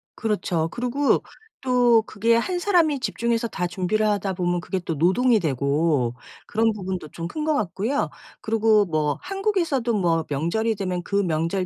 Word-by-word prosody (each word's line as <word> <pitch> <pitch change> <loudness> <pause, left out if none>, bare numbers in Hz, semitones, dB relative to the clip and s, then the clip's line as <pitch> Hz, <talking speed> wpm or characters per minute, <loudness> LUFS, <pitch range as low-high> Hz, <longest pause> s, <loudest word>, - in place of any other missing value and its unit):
그렇죠. 195 -7 -1
그리고 250 +4 +1 0.4
또 245 -3 +4
그게 230 +2 +1
1 355 +10 0
사람이 335 -7 +2
집중해서 235 -1 -1
다 180 -5 -3
준비를 195 +4 0
하다 205 -2 0
보면 175 -1 -1
그게 190 +1 -3
또 170 -2 -4
노동이 215 - +3
되고 140 -4 0 0.3
그런 225 +1 +2
부분도 185 -6 -5
좀 165 0 -6
큰 305 - -5
거 310 - +2
같고요 220 +5 -1 0.3
그리고 220 -1 +3
뭐 155 -3 0
한국에서도 360 - -1
뭐 170 -6 +1
명절이 170 +11 0
되면 185 -3 -3
그 200 - -4
명절 170 +1 -1
205 Hz, 315 characters per minute, -23 LUFS, 170-235 Hz, 0.4 s, 또